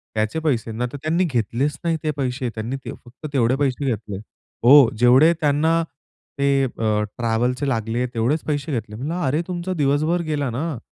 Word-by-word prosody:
त्याचे 110 +8 0
पैसे." 130 -8 -1
नाही 120 +3 -3
तर - - -4
त्यांनी 165 +4 +1
घेतलेच 135 - -1
नाही 165 -1 +1
ते 155 - 0
पैसे. 125 -2 -2
त्यांनी 115 +4 -3
ते - - -4
फक्त 125 +5 -11
तेवढे 125 -2 +2
पैसे 140 0 -1
घेतले. 105 -5 -3 0.5
हो. 135 0 +8
जेवढे 130 +7 +6
त्यांना 160 +3 +2 0.6
ते 140 -1 +3
अ, - - -3 0.5
ट्रॅव्हलचे 120 +3 0
लागले, 115 0 -1
तेवढेच 125 +7 0
पैसे 150 0 -2
घेतले. 110 -5 -4
म्हटलं, 140 +9 -4
"अरे, 145 +5 +1
तुमचा 180 0 -3
दिवसभर 155 +2 +1
गेला 145 -3 -1
ना. 145 +4 -3
135 Hz, 170 wpm, -22 LUFS, 120-155 Hz, 0.6 s, हो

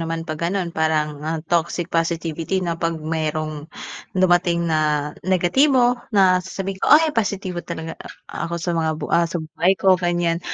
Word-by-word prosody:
naman 165 0 -3
'pag 155 -2 -5
gano'n 180 -3 -2
parang, 155 -2 0
ah, 160 +2 -2
toxic 170 +1 -1
positivity 165 +2 -1
na 170 - -1
'pag 165 0 -2
merong 155 -1 -3 0.5
dumating 175 -2 +3
na 150 -2 0 0.2
negatibo 245 - +4 0.2
na 185 -2 +5
sasabihin 190 +1 -5
ko - - +1
"Ay, 310 0 +6
positibo 200 -5 -2
talaga 165 -1 -7 0.3
a - - -4
ako 170 - -3
sa 170 +1 -2
mga 160 -1 0
bu 155 - -5
ah, 170 0 +3
sa 175 - -3
buhay 175 +4 +1
ko 190 +2 +4
ganyan." 175 -1 0
170 Hz, 165 wpm, -21 LUFS, 160-185 Hz, 0.5 s, Ay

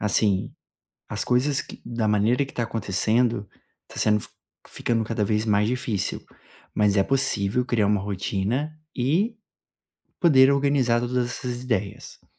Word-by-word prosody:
Assim, 105 -2 +1 0.6
as - - -1
coisas 135 +3 +2
que - - -12
da 115 -2 -2
maneira 110 +6 +2
que - - -14
tá 120 - -1
acontecendo, 115 +1 0 0.4
tá - - -13
sendo 105 0 +3
f - - -8 0.4
ficando 115 -1 -1
cada 110 -1 -1
vez 105 +1 0
mais 105 -1 +2
difícil, 120 -6 -2 0.5
mas 105 -1 +2
é 100 - +5
possível 125 -2 +1
criar 110 -5 +1
uma 105 -1 +2
rotina 100 +8 -2 0.2
e 170 - +1 0.8
poder 140 -5 +6
organizar 140 -4 +2
todas 125 0 -1
essas 125 0 -4
ideias. 105 -6 -4
115 Hz, 140 wpm, -24 LUFS, 105-130 Hz, 0.8 s, poder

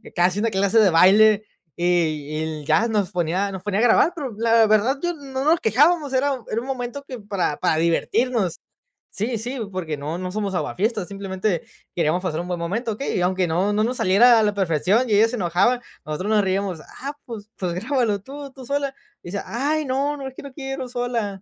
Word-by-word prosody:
casi 180 +2 +2
una 230 +2 +1
clase 200 +2 +2
de 210 - +6
baile, 205 +5 +5 0.3
y 175 - -2
y 155 -3 0
l 155 -2 -5
ya 160 +11 +3
nos 210 -3 0
ponía 180 +3 -1
nos 190 -2 -6
ponía 205 0 -1
a - - +3
grabar. 280 +8 +4
Pero 280 -7 -4
la 230 -1 +4
verdad, 220 +6 +2
yo 350 0 0
no 270 -3 -5
nos 320 +2 +3
quejábamos, 290 - +3
era 265 0 +1
era 225 +2 -1
un 260 - -9
momento 260 +1 -4
que 255 -4 -7
para 200 -7 -2
para - - +1
divertirnos. 190 +4 0 0.5
Sí, 225 +3 -2
sí, 245 +4 -5
porque 165 -5 -4
no 150 +4 -4
no 185 0 -4
somos 205 -1 -2
aguafiestas, 205 +2 -1
simplemente 195 -2 -2 0.3
queríamos 170 +1 +1
pasar 165 -4 -2
un 175 - -7
buen 175 -1 -3
momento, 220 +8 -2
¿okey? 220 +1 -3
Y - - 0
aunque 185 0 +1
no 180 +6 +1
no 215 +1 +2
nos 245 +2 -1
saliera 230 +6 +5
a 220 - +3
la 210 - +1
perfección, 195 - +1
y - - +2
ella 215 +2 +5
se 245 +1 -4
enojaba, 195 +7 +2 0.2
nosotros 155 +7 -3
nos 210 -2 +3
reíamos. 190 -3 -1 0.2
Ah, 280 +2 -4
pues 215 -3 -8
pues 180 -3 -2
grábalo 225 +1 0
tú 280 +3 -9
tú 260 -1 -12
sola. 280 +1 -1 0.3
Y 175 - -8
decía: 200 - -3
"Ay 295 +6 -1
no, 280 +3 -1
no, 270 - -6
es 260 - -10
que - - -9
no 275 - -9
quiero 270 -2 -5
sola". 235 -6 -3
210 Hz, 215 wpm, -22 LUFS, 185-250 Hz, 0.5 s, de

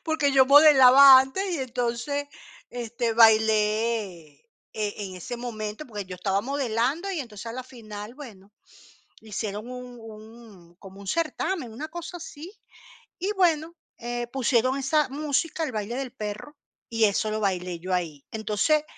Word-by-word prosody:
porque 315 -3 +1
yo 265 -1 +5
modelaba 275 -2 +9
antes 265 +9 -3
y - - -3
entonces, 255 +3 -2 0.4
este, 235 -1 -3
bailé 215 -6 +2 0.3
e 210 -1 -4
en 185 - -10
ese 245 +6 -6
momento, 220 +1 -6
porque 210 -4 -6
yo 185 0 -8
estaba 195 +1 0
modelando, 275 - -1
y 345 -5 -2
entonces 225 -3 -9
a 230 - -5
la 255 +1 -5
final, 220 -3 -10
bueno, 210 -8 -13 0.7
hicieron 215 0 -5
un 250 -1 -9
un, 220 -5 -14
como 195 0 -13
un 200 - -11
certamen, 330 - -2
una 295 +8 -6
cosa 345 +2 -7
así, 325 +1 -10 0.7
y 385 +4 -1
bueno, 335 -4 +1 0.2
eh, 240 0 -4
pusieron 255 0 +1
esa 275 +1 +1
música, 300 +3 -2
el 260 - -5
baile 215 +3 -4
del 265 -2 -5
perro, 215 +6 -7 0.3
y 225 -1 0
eso 215 +1 0
lo 215 - -2
bailé 180 -3 -2
yo 185 +2 -4
ahí. 160 -6 -3
Entonces, 220 +8 +1
235 Hz, 150 wpm, -25 LUFS, 210-280 Hz, 0.7 s, modelaba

